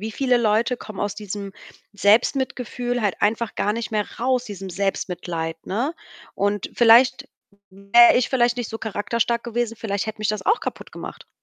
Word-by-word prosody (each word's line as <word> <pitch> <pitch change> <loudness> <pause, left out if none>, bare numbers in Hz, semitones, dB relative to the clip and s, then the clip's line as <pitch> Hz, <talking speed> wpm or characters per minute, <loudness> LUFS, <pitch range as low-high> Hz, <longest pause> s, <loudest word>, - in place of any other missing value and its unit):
wieviele 245 +4 0
Leute 230 +2 +1
kommen 215 -4 -9
aus 205 -1 -2
diesem 205 -1 -6 0.4
Selbstmitgefühl 245 +3 +1
halt 205 -4 -1
einfach 225 +1 0
gar 205 - 0
nicht 230 +1 -4
mehr 210 -1 0
raus, 250 +1 +1
diesem 195 -3 -7
Selbstmitleid, 175 -4 -3
ne? 250 - -2 0.4
Und 205 0 -1
vielleicht 240 +2 +5 0.4
wäre 200 +5 +5
ich 245 - +2
vielleicht 245 -2 +2
nicht 245 -3 -3
so 225 - -5
charakterstark 230 +2 -1
gewesen, 235 -1 -2
vielleicht 205 -2 -3
hätte 220 0 -6
mich 215 -1 -2
das 215 0 -2
auch 435 +4 +2
kaputtgemacht. - - -8
220 Hz, 160 wpm, -22 LUFS, 205-240 Hz, 0.4 s, vielleicht